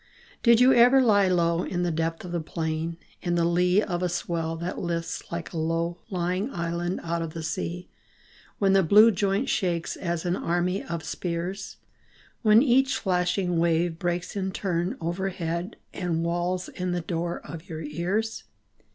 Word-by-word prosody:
Did 235 -1 +6
you 255 +1 +7
ever 245 +3 +7
lie 205 -6 +4
low 170 -2 +2
In 180 -1 -2
the 175 - 0
depth 165 +1 -2
of 175 - -7
the 175 - -1
plain, 160 +1 -3
& - - -31
In 175 0 0
the 170 -1 +2
lee 180 +4 +3
of 175 -1 -2
a 180 - +1
swell 165 -1 -2
that 170 +2 -4
lifts 170 -1 -3
Like 170 +1 -5
a 165 - -2
low 165 +2 -1
lying 185 +4 -1
island 170 +1 -2
out 170 0 -2
of 165 -1 -5
the 165 - -4
sea, 170 +3 -4 0.7
When 195 -1 +3
the 195 - +6
blue 210 +6 +7
joint 200 +4 0
shakes 175 -4 -1
As 170 -2 -3
an 175 0 +1
army 175 +2 0
of 170 -1 -5
spears; 180 +3 -4 0.6
When 220 +1 +6
each 265 0 +3
flashing 180 -1 0
wave 170 0 +1
breaks 175 +1 -2
In 190 -1 -1
turn 180 -1 -2
overhead 175 +1 -3 0.2
And 170 -2 -1
wails 175 +2 -1
in 180 -1 -3
the 175 - -1
door 170 +1 -3
of 165 +3 -10
your 160 -1 -5
ears 180 +9 -2
175 Hz, 175 wpm, -26 LUFS, 170-190 Hz, 0.7 s, you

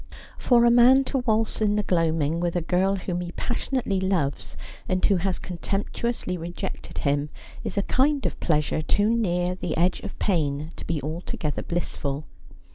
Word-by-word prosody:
For 240 -2 +4
a 235 - +6
man 250 +3 +7
to 270 0 -1
waltz 225 -3 0
in 210 -1 +3
the 210 - +1
gloaming 165 -3 +1
with 175 0 -1
a 175 - +1
girl 185 +4 +1
whom 180 -2 -3
he 175 0 -6
passionately 240 -5 -1
loves, 180 -8 -1 0.3
and 185 0 +1
who 200 - +4
has 185 +1 0
contemptuously 195 +3 -3
rejected 170 +1 -6
him, 145 +1 0 0.3
is - - -4
a 200 - +2
kind 280 +5 +2
of - - -2
pleasure 150 -1 +1
too 205 +8 +2
near 180 -5 +1
the 180 -3 -4
edge 180 +2 +2
of - - -8
pain 155 -5 0
to - - -7
be 160 -4 -2
altogether 155 -1 -3
bliss 175 0 -2
ful. 140 +1 -3
180 Hz, 175 wpm, -25 LUFS, 165-215 Hz, 0.3 s, man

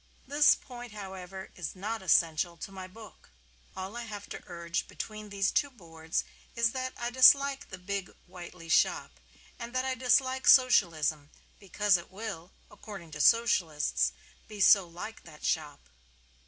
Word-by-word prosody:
This 290 +2 +5
point, 245 -3 -11
however, 190 -2 -8
is 175 -1 -6
not 215 +4 -4
essential 170 -1 +2
to 195 - -8
my 190 -1 -8
book. 215 +2 -15 0.5
All 190 +3 -6
I 240 0 -5
have 205 -2 -8
to - - -7
urge 170 0 -4
between 215 -1 -7
these 200 -1 0
two 285 - +1
boards 165 -8 -5 0.3
is 235 -1 +2
that 255 0 -4
I 240 0 -3
dislike 275 +2 +5
the 185 - -8
big 195 +1 -4 0.2
Whiteley 175 -1 -11
shop, 160 - +1 0.4
and 240 +1 -8
that 255 0 0
I 265 - 0
dislike 260 +1 +1
Socialism 160 - +4 0.3
because 200 0 +2
it 175 - -11
will 195 -4 -7 0.2
(according 195 -7 -11
to 150 0 -4
Socialists) 175 -9 +2 0.4
be 210 -1 -10
so 195 -2 +6
like 180 +6 -8
that 155 -3 -12
shop. 150 - -2
195 Hz, 155 wpm, -29 LUFS, 170-235 Hz, 0.5 s, so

